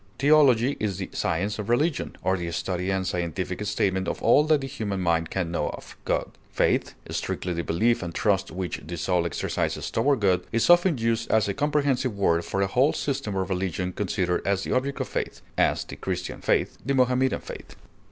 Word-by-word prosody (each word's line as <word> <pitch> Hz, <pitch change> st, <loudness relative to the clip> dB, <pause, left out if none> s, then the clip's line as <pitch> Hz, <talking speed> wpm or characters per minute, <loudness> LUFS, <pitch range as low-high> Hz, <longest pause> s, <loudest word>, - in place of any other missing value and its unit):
Theology 140 Hz, -3 st, +4 dB
is 100 Hz, -4 st, -1 dB
the 95 Hz, -, -5 dB
science 100 Hz, +6 st, -1 dB
of 105 Hz, +1 st, -4 dB
religion, 145 Hz, +6 st, +1 dB
or 95 Hz, +1 st, +2 dB
the 85 Hz, -2 st, -3 dB
study 90 Hz, +2 st, -2 dB
and 95 Hz, -1 st, 0 dB
scientific 90 Hz, +2 st, -2 dB
statement 95 Hz, -2 st, 0 dB
of -, -, -2 dB
all 130 Hz, +6 st, +6 dB
that 155 Hz, -2 st, +3 dB
the -, -, -4 dB
human 100 Hz, -6 st, -3 dB
mind 85 Hz, -2 st, +1 dB
can 90 Hz, -3 st, -2 dB
know 85 Hz, -, -1 dB
of -, -, -9 dB
God. -, -, -1 dB, 0.2 s
Faith, -, -, +1 dB, 0.2 s
strictly 90 Hz, -, -2 dB
the 85 Hz, -, -2 dB
belief 115 Hz, +10 st, +1 dB
and 85 Hz, -2 st, -4 dB
trust 100 Hz, +2 st, +1 dB
which 90 Hz, +2 st, -4 dB
the 85 Hz, +3 st, -6 dB
soul 85 Hz, +1 st, +1 dB
exercises 80 Hz, -, -2 dB
toward 140 Hz, -5 st, +2 dB
God, 95 Hz, -3 st, +3 dB
is 115 Hz, +9 st, +3 dB
often 175 Hz, -3 st, +5 dB
used 115 Hz, 0 st, 0 dB
as 110 Hz, -2 st, +3 dB
a 100 Hz, -, -1 dB
comprehensive 140 Hz, -4 st, 0 dB
word 85 Hz, -4 st, +2 dB
for 100 Hz, +3 st, -1 dB
a -, -, +3 dB
whole 130 Hz, +8 st, +3 dB
system 130 Hz, -8 st, -2 dB
of 95 Hz, -1 st, -1 dB
religion 90 Hz, 0 st, -2 dB
considered 90 Hz, -2 st, -1 dB
as 100 Hz, -1 st, 0 dB
the -, -, -4 dB
object 135 Hz, +2 st, -1 dB
of -, -, -2 dB
faith; -, -, -4 dB
as, -, -, +2 dB
the -, -, -10 dB
Christian 90 Hz, -1 st, -4 dB
faith; -, -, 0 dB
the 140 Hz, -, 0 dB
Mohammedan 130 Hz, 0 st, +2 dB
faith. -, -, -10 dB
100 Hz, 200 wpm, -26 LUFS, 90-125 Hz, 0.2 s, all